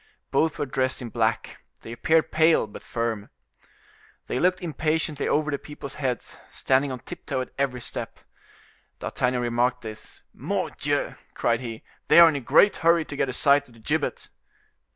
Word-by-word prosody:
Both 160 -1 +1
were - - -1
dressed 130 -1 -1
in 120 - -6
black; - - -1 0.2
they 115 - -9
appeared 160 +7 +2
pale, 160 -3 +4
but 105 - -11
firm. 115 -3 -3 1.0
They 125 - -2
looked 180 +3 +2
impatiently 155 -2 -1
over 150 0 +1
the 140 - -2
people's 150 -2 -8
heads, 125 -3 -3
standing 135 +1 +1
on 125 -2 -6
tip - - -10
toe 130 -2 -1
at 125 - -7
every 130 -3 -1
step. - - -5 0.8
D'Artagnan 125 0 -1
remarked 120 +1 +1
this. 110 -2 -10
"Mordioux!" - - -2 0.2
cried 115 -1 +1
he, 115 -3 -7 0.2
"they - - +7
are 170 - +10
in 160 - +2
a - - -1
great 200 - +4
hurry 165 -1 +3
to 140 - -7
get 135 - 0
a - - -3
sight 140 +2 +4
of 120 - -19
the - - -17
gibbet!" 150 +6 -2
135 Hz, 175 wpm, -25 LUFS, 120-155 Hz, 1.0 s, are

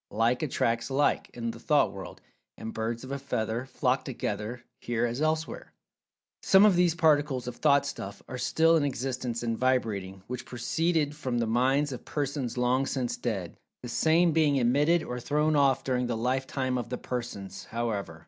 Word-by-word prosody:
"Like 115 +3 +1
attracts 115 -5 0
Like," 140 +2 +1
in 115 -1 -3
the 115 - -11
Thought 145 -6 +3
World, 95 -1 -9 0.4
and 110 - -6
"Birds 115 +2 -3
of 130 - -8
a 140 - -3
feather 120 -2 -2
flock 130 0 0
together," 115 -1 -4 0.2
here 120 0 -1
as 120 +4 -3
elsewhere. 155 +1 -2 0.7
Some 195 +2 +6
of 205 -4 +5
these 175 -2 +3
particles 145 -6 +2
of 125 - -5
"Thought 140 -2 +4
stuff" 100 -8 -6
are 125 - -6
still 165 +4 +3
in 155 - +1
existence, 130 -3 -2
and 115 -1 0
vibrating, 105 -7 -1
which 125 0 -5
proceeded 150 +4 0
from 130 -5 -2
the 115 - +1
minds 130 +6 +2
of 125 - -6
persons 140 -4 -3
long 125 +2 +2
since 125 -4 -2
dead, 100 -8 -4 0.3
the 120 - -6
same 165 +7 +3
being 155 -2 +3
emitted 145 +7 +3
or 125 0 -5
thrown 150 +4 +1
off 135 -2 +3
during 125 -2 0
the 120 -2 -2
lifetime 130 +1 -1
of 120 - -5
the 125 - -3
persons, 120 -6 -6
however. 115 -3 -3
125 Hz, 175 wpm, -28 LUFS, 115-145 Hz, 0.7 s, Some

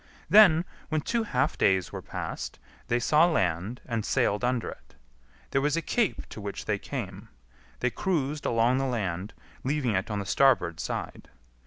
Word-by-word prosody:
Then, 180 -6 +7 0.2
when 155 -1 0
two 235 +9 0
half 145 - 0
days 95 -2 +2
were - - -6
passed, - - -5 0.3
they 120 - +2
saw 150 +7 +4
land, 95 - -1
and 115 -3 -2
sailed 105 +1 +1
under 125 -1 0
it. - - -16 0.6
There 135 - +2
was 150 +3 +1
a - - +1
cape 230 +5 0
to 110 - -8
which 100 0 -5
they 105 -2 0
came. 105 -5 -6 0.5
They 125 - +1
cruised 150 -4 -1
along 120 +3 +3
the 135 - 0
land, 100 -5 -3 0.3
leaving 135 -4 0
it 95 +1 -1
on 105 - -2
the 100 - -3
starboard 95 -10 +3
side. 75 - -5
125 Hz, 170 wpm, -28 LUFS, 100-150 Hz, 0.6 s, Then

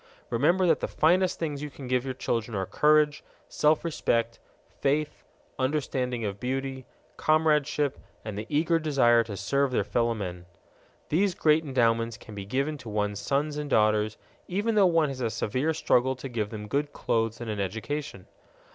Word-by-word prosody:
Remember 170 +10 +3
that 165 -3 +3
the - - -2
finest 180 +3 +2
things 150 -4 -3
you 150 - -4
can 135 -2 -10
give 125 -1 +1
your 130 -1 -3
children 115 -3 -2
are 95 - -1
courage, 150 +5 +3 0.2
self 150 +2 +2
respect, 115 -7 0 0.4
faith, 150 +2 0 0.4
understanding 130 -4 -1
of 100 -1 -4
beauty, 130 +1 -3 0.3
comradeship, 150 -2 +2 0.3
and 110 -2 -5
the 105 +2 -5
eager 165 +3 +2
desire 130 -7 +4
to 105 -3 -7
serve 140 +8 +1
their 125 - +1
fellowmen. 100 -7 -2 0.6
These 185 +3 +2
great 155 +1 +3
endowments 115 -4 +1
can 110 - -12
be 100 -1 -6
given 140 +6 -1
to 120 -3 -9
one's 105 -1 -1
sons 145 +7 -1
and 150 -1 -4
daughters 110 -2 +2 0.3
even 205 +5 0
though 205 -3 +5
one 165 -4 +3
has 130 -1 -6
a 115 - 0
severe 130 +7 -1
struggle 130 -4 +2
to 130 +2 -7
give 110 -5 -3
them 105 -1 -7
good 145 +6 -1
clothes 115 -1 -1
and 120 - -6
an 105 -2 -3
education. 110 +4 -4
130 Hz, 170 wpm, -27 LUFS, 115-150 Hz, 0.6 s, though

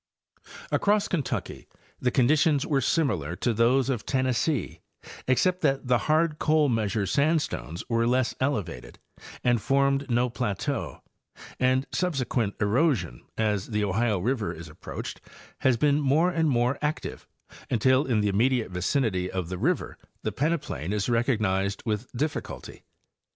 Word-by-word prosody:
Across 205 0 +2
Kentucky 155 -8 -3 0.3
the 125 - +1
conditions 145 +3 +3
were 140 -3 +1
similar 105 - 0
to 120 +5 0
those 120 +4 +3
of 130 -5 -1
Ten 130 -1 0
nessee, 130 - -1 0.5
except 180 +8 +2
that 135 -3 +1
the 125 -1 +3
hard 155 0 +2
Coal 155 -2 +3
Measure 110 -3 0
sandstones 140 - 0
were 115 -1 +1
less 125 0 +1
elevated 100 - -3 0.5
and 120 -1 +3
férmed 140 +3 +1
no 120 +1 +2
plateau, 105 -5 -3 0.6
and 130 +1 +2
subsequent 130 - -1
erosion, 105 - +1 0.2
as 105 -3 0
the 105 -2 -1
Ohio 105 +2 +1
river 115 +3 -1
is 80 0 -9
approached, 75 - -7 0.4
has 130 -3 +3
been 145 +3 +2
more 150 +6 +3
and 165 -3 +1
more 125 +1 +1
active, 150 +1 -3 0.4
until 130 +4 +3
in 115 -5 +1
the 105 - +1
immediate 115 +2 +1
vicinity 90 - 0
of 95 -3 -3
the 95 -1 -4
river 160 - -1 0.2
the - - -1
pleneplain 140 - -2
is 105 +2 -1
recognized 105 -5 0
with 110 +2 -2
difficulty. 150 +5 -4
125 Hz, 140 wpm, -26 LUFS, 105-140 Hz, 0.6 s, conditions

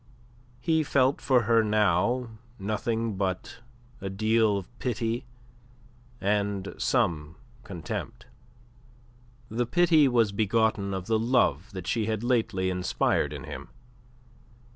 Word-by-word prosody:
He 160 +5 +2
felt 140 -2 +2
for 125 -3 +3
her 115 0 +4
now 110 +3 +1 0.3
nothing 110 +1 -2
but 95 +2 -3 0.4
a 95 - -3
deal 110 +1 +2
of 110 +6 -9
pity 120 0 -2 0.9
and 100 0 -1
some 85 - 0 0.3
contempt. 90 -7 -6 1.2
The 115 +2 -1
pity 165 -1 +4
was 115 -5 +3
begotten 105 -1 +1
of 95 -1 -5
the 110 +1 +1
love 115 - +2 0.2
she 110 +2 0
had 110 0 -2
lately 110 -7 +1
inspired 90 0 0
in - - -7
him. - - -8
110 Hz, 110 wpm, -27 LUFS, 100-120 Hz, 1.2 s, her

